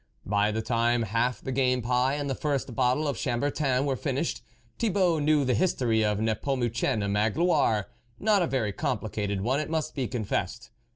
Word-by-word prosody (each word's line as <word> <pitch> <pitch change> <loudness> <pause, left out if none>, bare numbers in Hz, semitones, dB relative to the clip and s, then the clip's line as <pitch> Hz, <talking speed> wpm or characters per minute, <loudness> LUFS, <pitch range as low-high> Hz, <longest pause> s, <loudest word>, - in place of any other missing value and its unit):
By 105 +1 +2
the 110 +1 -2
time 115 0 +1
half 115 +4 0
the 130 - -4
game 125 -1 +1
pie, 125 +3 +1
and 145 -1 -3
the 135 - -1
first 140 -2 -2
bottle 130 +5 +1
of 140 -5 -2
Chambertin 135 +1 0
were 135 -2 0
finished, - - -2 0.4
Thibault 185 -7 +2
knew 150 -1 +3
the 125 - +2
history 120 -10 +1
of 105 -1 +1
Nepomucene 115 -1 0
Magloire; 110 - +2 0.3
not 210 -2 +3
a 175 - +1
very 120 -8 -1
com 140 0 -1
plicated 105 -2 -3
one, 130 +7 +1
it 155 - -3
must 160 -1 -2
be 130 -4 -2
confessed. 110 -4 -3
125 Hz, 175 wpm, -27 LUFS, 110-145 Hz, 0.4 s, knew